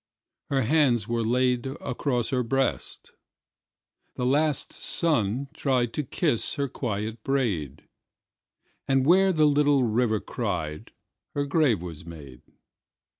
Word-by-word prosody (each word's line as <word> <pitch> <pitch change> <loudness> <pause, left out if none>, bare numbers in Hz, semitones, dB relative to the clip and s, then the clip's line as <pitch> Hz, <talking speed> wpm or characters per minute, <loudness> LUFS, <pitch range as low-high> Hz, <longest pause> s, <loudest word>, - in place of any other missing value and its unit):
Her 135 -2 +1
hands 125 -5 +2
were 115 0 -1
laidAcross 125 +1 -1
her 130 -1 +1
breast; 135 +3 -2 1.0
the 125 - -2
last 145 +3 +1
sun 140 - +2
triedTo 130 -1 -1
kiss 115 - +1
her 140 -1 -1
quiet 110 -3 -4
braid; 100 - -2 1.0
And 135 -1 +2
where 190 +4 +5
the 155 -3 +3
little 145 -2 +3
river 110 -1 +1
cried, 85 -12 -4 0.4
Her 145 0 0
grave 140 - +1
was 85 -2 -8
made. 75 -7 -11
125 Hz, 110 wpm, -26 LUFS, 110-140 Hz, 1.0 s, where